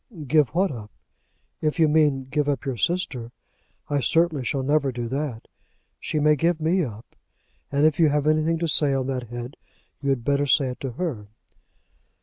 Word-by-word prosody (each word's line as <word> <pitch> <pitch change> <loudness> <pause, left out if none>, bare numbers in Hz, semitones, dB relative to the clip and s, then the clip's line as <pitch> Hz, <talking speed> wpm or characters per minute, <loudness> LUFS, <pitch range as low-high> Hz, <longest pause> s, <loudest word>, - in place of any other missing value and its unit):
"Give 150 0 +3
what 190 +1 +2
up? 110 -5 -8 0.7
If 155 +2 -1
you 160 - +5
mean 150 -3 +3
give 145 -1 +1
up 140 -4 -2
your 135 -2 -2
sister, 125 - -2 0.6
I 145 - 0
certainly 160 0 +2
shall 135 +1 -1
never 145 0 +1
do 120 -1 -4
that. 135 -3 -4 0.5
She 155 - -2
may 150 +1 +4
give 165 +2 +1
me 170 +4 +2
up, 110 -5 -8 0.6
and 140 +2 +3
if 155 0 +2
you 160 -2 +5
have 145 0 0
anything 155 +2 +2
to 170 +1 -1
say 150 -3 +2
on 130 -1 -1
that 130 -2 -3
head, 120 +2 -7 0.4
you 140 - -1
had 135 -4 0
better 140 0 +1
say 135 -1 +3
it 125 - -7
to 135 -3 -5
her." 125 - -4
145 Hz, 185 wpm, -24 LUFS, 130-155 Hz, 0.7 s, you